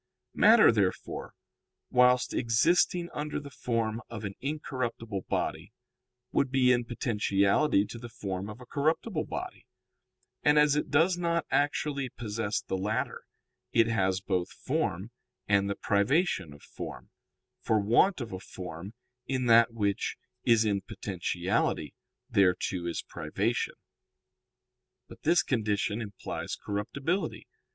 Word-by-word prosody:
_ - - -57 0.3
Matter, 220 - +7
therefore, 100 -5 -2 0.6
whilst 125 0 +4
existing 170 +9 +2
under 150 0 -3
the 145 -1 -10
form 115 -3 -2
of 115 -2 -7
an 100 - -4
incorruptible 125 -8 -3
body, - - -2 0.6
would 140 - +2
be 130 -1 +4
in 120 -1 +2
potentiality 105 0 +2
to 115 - -9
the 120 0 -8
form 100 -3 -5
of 105 +2 -9
a 125 - -11
corruptible 155 - 0
body; - - -6 0.7
and 150 0 +4
as 150 -1 +5
it 150 - -1
does 170 +4 +3
not 170 -1 0
actually 145 -1 0
possess 110 -2 -3
the 95 - -3
latter, 105 +3 -2 0.5
it 115 -1 +5
has 95 -5 +1
both 95 -2 -1
form 115 - -2 0.4
and 100 -1 +3
the 100 - -1
privation 100 - +1
of 70 0 -14
form; - - -8 0.5
for 110 - +2
want 120 - +3
of 115 -5 -6
a 95 - -4
form 90 +2 -8 0.3
in 130 -2 -1
that 115 0 +6
which 100 -3 -1 0.3
is 115 -1 +4
in 100 -2 +1
potentiality 90 -6 -2 0.3
thereto 95 -5 +1
is 85 - -3
privation. 100 +10 -2 1.3
But - - -14
this 175 +2 +4
condition 110 -2 0
implies 105 -3 -5
corruptibility. 135 - -3
115 Hz, 130 wpm, -29 LUFS, 100-140 Hz, 1.3 s, Matter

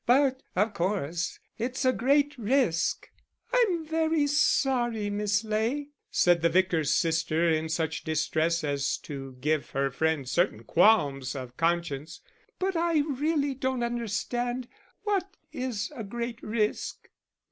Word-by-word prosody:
But, 265 +1 +4
of 210 +3 +2
course, 175 -3 -1 0.2
it's 255 +4 -2
a 255 - +4
great 285 +4 +2
risk." 230 - +1 0.5
"I'm 390 -10 +2
very 320 -1 +1
sorry, 245 -7 +2
Miss 210 +1 0
Ley," 225 +7 -1 0.2
said 175 -1 +3
the 170 - +4
vicar's 170 -4 +2
sister, 165 0 +2
in 160 -1 +1
such 160 -1 -2
distress 160 +1 0
as 140 -1 0
to 135 -2 -7
give 150 +1 0
her 135 0 0
friend 160 -1 0
certain 170 +8 +1
qualms 140 -11 +3
of 125 -2 -7
conscience, 165 -2 -1 0.4
"but 380 0 -1
I 330 -2 +2
really 290 +1 0
don't 260 -1 -1
understand. 240 +2 -2 0.4
What 395 -3 -1 0.2
is 240 -3 -3
a 230 - -5
great 235 +3 -5
risk?" 215 -1 -2
215 Hz, 130 wpm, -28 LUFS, 160-260 Hz, 0.5 s, But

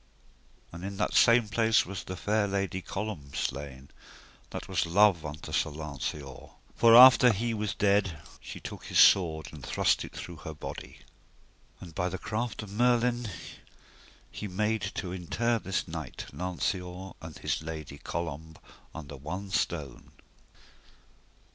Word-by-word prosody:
And 85 +1 -9
in 100 0 -5
that 105 - 0
same 115 -1 +5
place 110 +1 +3
was 95 +1 -6
the 95 - -6
fair 105 0 +1
lady 100 -1 -2
Colombe 95 -10 -5
slain, 70 -1 -4 0.6
that - - -6
was - - 0
love 95 -1 +4
unto 75 0 -7
Sir 80 +1 +1
Lanceor; 75 -2 -6 0.3
for 115 0 +6
after 125 0 +10
he 115 +3 -1
was 105 -2 -2
dead 100 -4 +2 0.2
she - - -9
took - - -8
his - - -2
sword 80 -5 +5
and 75 -4 -10
thrust - - +1
it - - -9
through 85 -1 -7
her 80 -1 -8
body. - - -8 0.8
And 85 -3 -11
by 90 +2 -1
the 95 - -4
craft 110 +2 -3
of 100 - -10
Merlin 120 +1 +2 1.0
he 105 - -6
made 105 +3 0
to 90 -3 -4
inter 115 +6 -1
this 95 -1 -2
knight, 80 -5 -6
Lanceor, 90 +1 -3
and 80 -2 -9
his - - -2
lady, 80 -3 -7
Colombe, 80 -1 -5 0.4
under 75 -2 -8
one 90 +8 -6
stone. 75 -8 -3
95 Hz, 145 wpm, -29 LUFS, 80-105 Hz, 1.0 s, after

